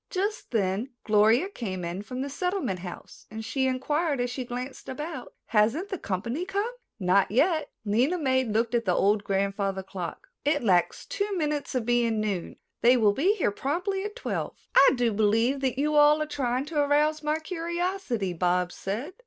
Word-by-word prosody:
Just 410 +3 -2
then 205 +2 0
Gloria 220 - +4
came 190 - -5
in 175 +3 -4
from 255 +5 -5
the - - -3
Settlement 360 - -2
House 175 -1 -10
and 220 +1 -7
she 265 +4 0
inquired 290 +3 0
as 245 0 -1
she 255 +1 -3
glanced 250 +2 -6
about: 295 -1 -6
"Hasn't 230 - +2
the 380 -5 -4
company 230 - -3
come?" 405 +5 -2 0.3
"Not 190 +1 +3
yet." 310 - +2 0.2
Lena 245 - +2
May 260 -5 +2
looked 225 0 0
at 235 -1 +1
the 180 -2 +2
old 205 +1 +2
grandfather 195 -1 -1
clock. 180 -4 -7
"It 290 -2 +1
lacks 180 -5 +2
two 415 -5 -2
minutes 300 -4 -2
of 245 -3 0
being 235 -2 +2
noon. 200 -5 -2 0.3
They 245 +2 +6
will 210 -3 +4
be 365 - +2
here 360 - +1
promptly 360 - -2
at 420 0 -5
twelve." - - -4 0.2
"I 275 - +8
do 240 -3 +1
believe 225 +6 +2
that 265 -1 -1
you 300 +2 +1
are 295 - +6 0.2
all 305 - 0
trying 265 -3 -1
to 305 0 -2
arouse 300 +2 +2
my 305 0 0
curiosity," 335 - -2
Bobs 180 +1 +1
said. 230 - -4
250 Hz, 180 wpm, -27 LUFS, 210-305 Hz, 0.3 s, I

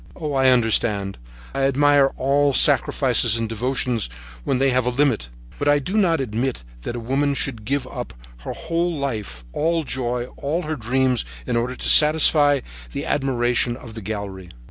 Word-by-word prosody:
Oh, 150 -4 -4
I 135 -1 +4
understand, 110 - +2 0.3
I 135 - -2
admire 140 0 +4
all 140 +1 +2
sacrifices 115 - +3
and 115 -1 -2
devotions 120 - -1 0.3
when 130 - 0
they 135 +1 +2
have 125 -1 +1
a - - +3
limit, 125 - 0 0.3
but - - -1
I 145 0 +5
do 160 +8 -4
not 180 -7 +2
admit 125 - -3 0.2
that 120 - -5
a - - -4
woman 140 +4 0
should 115 -6 -2
give 140 +1 -1
up 125 - -7 0.2
her - - -6
whole 170 0 -2
life, 105 - -5
all 165 +1 0
joy, 125 -3 -2
all 160 +6 -2
her 155 0 -3
dreams, 130 0 0 0.2
in - - -2
order 120 +2 -1
to - - -4
satisfy 150 -2 +5 0.3
the - - -4
admiration 125 -3 0
of 120 -3 -11
the 110 - -8
gallery. 100 -3 -6
130 Hz, 170 wpm, -22 LUFS, 115-145 Hz, 0.3 s, I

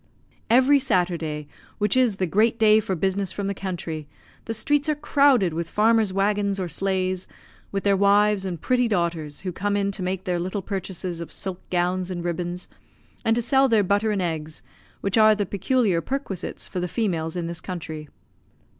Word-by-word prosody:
Every 260 +4 +5
Saturday, 170 - 0 0.3
which 210 +1 +1
is 250 -5 +3
the 190 - 0
great 220 +6 +2
day 215 -1 +5
for 195 -3 -2
business 190 +2 0
from 200 - -4
the 200 - -1
country, 170 -5 -5 0.4
the 225 - -3
streets 290 +5 +1
are 305 - +2
crowded 280 - +3
with 165 +1 -3
farmers' 220 -1 +3
waggons 200 0 0
or 185 - -2
sleighs, 185 +2 -1 0.4
with 195 -1 -2
their 200 -1 +3
wives 200 +1 +3
and 180 -4 -4
pretty 250 +6 +2
daughters, 170 -7 -2
who 185 - -3
come 205 +3 -1
in 200 0 0
to 195 - -4
make 185 0 -2
their 180 -2 -1
little 185 +3 -3
purchases 185 -3 -4
of 170 - -7
silk 190 -2 -4
gowns 180 +1 0
and 175 -2 -4
ribbons, 175 +1 -3 0.6
and 225 - +2
to 240 - 0
sell 270 +3 +3
their 220 -3 +4
butter 205 +3 +1
and 200 -3 0
eggs, 160 -2 -4 0.4
which 200 +3 +1
are 215 0 +7
the 205 -1 -1
peculiar 200 -1 +1
perquisites 230 - -4
for 185 - -4
the 180 - -1
females 170 -6 -1
in 175 -2 -2
this 170 -1 -4
country. 160 -4 -6
195 Hz, 185 wpm, -24 LUFS, 175-215 Hz, 0.6 s, are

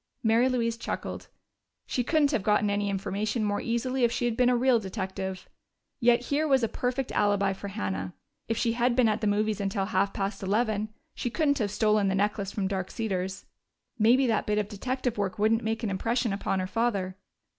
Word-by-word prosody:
Mary 230 +3 +4
Louise 230 -2 0
chuckled. - - -5 0.6
She 250 - -1
couldn't 300 +2 +2
have 235 - +1
gotten 210 +1 +2
any 205 0 0
information 200 +3 -1
more 205 -1 0
easily 250 +2 -1
if 235 - +4
she 240 - -1
had 235 -2 0
been 250 +1 +4
a 250 - +3
real 250 -1 +4
detective. 190 -2 -5 0.5
Yet 235 0 +4
here 290 +5 0
was 265 -4 +3
a - - +3
perfect 250 +3 -2
alibi 200 -1 +2
for 195 +1 -7
Hannah; 95 - -4 0.3
if 225 - -1
she 230 -1 +1
had 240 +1 +1
been 250 -2 +4
at 215 0 0
the 215 - +1
movies 210 0 +1
until 195 0 -1
half 200 -1 +1
past 195 +2 -3
eleven, 215 +1 0 0.2
she 245 - -3
couldn't 285 +2 +1
have 210 -3 0
stolen 210 0 +2
that 190 - +1
necklace 200 0 0
from 195 -2 -1
Dark 190 -2 -3
Cedars. 190 -3 -3 0.5
Maybe 245 +5 +5
that 225 -3 +1
bit 210 0 +1
of 210 -1 0
detective 250 +2 -3
work 195 -2 -1
wouldn't 220 +2 +2
make 225 +1 -2
an 210 - -1
impression 230 +3 0
upon 195 -1 -1
her 185 - -1
father! 195 -3 -1
215 Hz, 200 wpm, -28 LUFS, 200-240 Hz, 0.6 s, Maybe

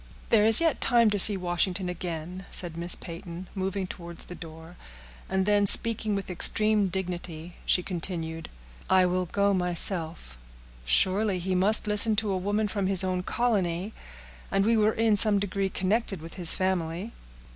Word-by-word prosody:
"There 215 -2 +4
is 225 - +6
yet 330 -2 0
time 235 -3 +3
to 205 - -1
see 200 +1 +8
Washington 180 +1 -2
again," 180 +1 -7
said 175 -3 -3
Miss 170 +1 +1
Peyton, 170 +1 -10
moving 190 0 -3
towards 170 -2 -9
the - - -9
door; 165 0 -12 0.5
and 190 0 -1
then, 205 0 +2
speaking 220 0 +4
with 195 -1 -5
extreme 215 +3 +2
dignity, 175 -2 -6
she 180 - +2
continued, 165 -3 -5 0.4
"I 185 -1 +4
will 180 0 -1
go 200 +3 0
myself; 170 - 0 0.5
surely 190 - +2
he 185 +1 -3
must 200 +5 +3
listen 210 +1 +2
to 210 -1 -2
a - - -1
woman 205 +3 -1
from 200 -2 -3
his 190 -1 +1
own 185 -1 -2
colony!—and 180 - -3
we 230 +1 +2
are 215 0 +2
in 220 -1 +1
some 210 0 +3
degree 195 0 -2
connected 195 +1 -2
with 165 +1 -11
his 175 -3 +3
family." 185 +2 -3
185 Hz, 160 wpm, -26 LUFS, 175-205 Hz, 0.5 s, see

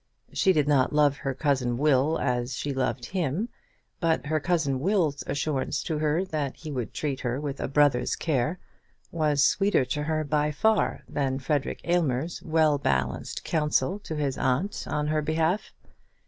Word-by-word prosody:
She 190 - +3
did 150 -5 +2
not 135 -3 +3
love 145 -1 +3
her 135 -1 -3
cousin 130 -5 0
Will 145 +2 +3
as 125 +1 -1
she 145 +1 -3
loved 130 -2 -1
him; 185 - -2 0.5
but 165 -3 +1
her 155 +1 0
cousin 155 -5 0
Will's 165 -3 +1
assurance 145 -2 -1
to 160 -3 -2
her 155 +4 +1
that 150 -6 -3
he 155 -2 -8
would 125 -6 -3
treat 140 -3 -3
her 125 +1 -2
with 145 -2 -4
a - - -2
brother's 140 -3 +3
care 155 +2 0 0.5
was 150 -4 +2
sweeter 195 -6 +3
to 150 - -2
her 155 +1 -1
by 150 0 +1
far 220 +8 +1
than 135 -2 -1
Frederic 140 +1 -1
Aylmer's 170 -3 0
well 155 -2 +2
balanced 65 - -1
counsel 155 +3 0
to 165 -6 -6
his 140 -3 -1
aunt 135 +11 0
on 150 - -1
her 155 0 +1
behalf. 160 +6 0
150 Hz, 165 wpm, -27 LUFS, 135-160 Hz, 0.5 s, She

